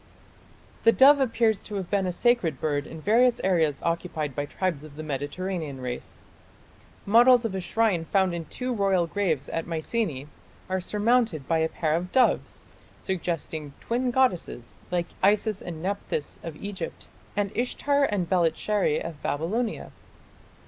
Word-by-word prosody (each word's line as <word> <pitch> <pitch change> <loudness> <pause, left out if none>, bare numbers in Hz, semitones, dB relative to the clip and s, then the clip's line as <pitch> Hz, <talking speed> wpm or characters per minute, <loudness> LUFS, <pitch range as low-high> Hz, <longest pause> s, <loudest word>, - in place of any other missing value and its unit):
The 230 - +7
dove 280 +4 +7
appears 230 -5 +2
to 210 - -8
have 190 -3 -4
been 195 -2 +1
a - - 0
sacred 180 - +1
bird 145 -2 -1
in 160 - -9
various 235 +6 +4
areas 160 -7 +1
occupied 165 -4 -2
by 145 - -1
tribes 175 -5 -2
of 155 -2 -12
the 155 - -6
Mediterranean 150 +1 -4
race. 125 -1 -6 0.8
Models 240 +3 +6
of 220 - -2
a 190 - -2
shrine 190 -3 +1
found 190 +1 +2
in 170 -1 -4
two 250 - -3
royal 195 -5 +2
graves 165 -6 -1
at 165 - -3
Mycenae 165 - -2 0.4
are 185 0 0
surmounted 210 - +1
by 165 -1 +2
a 160 0 +1
pair 155 -2 -1
of 180 +2 -3
doves, 260 -2 +2 0.4
suggesting 165 -5 -3
twin 245 +2 -1
goddesses 240 - 0
like 175 -1 0 0.2
Isis 210 +1 +2
and 165 -2 -7
Nepthys 195 -6 -3
of 165 -2 -7
Egypt 190 -1 -6 0.3
and 200 -1 0
Ishtar 280 +4 +1
and 200 -8 -1
Belitsheri 175 0 +1
of 165 -3 -7
Babylonia. 210 +11 -2
185 Hz, 150 wpm, -26 LUFS, 160-220 Hz, 0.8 s, The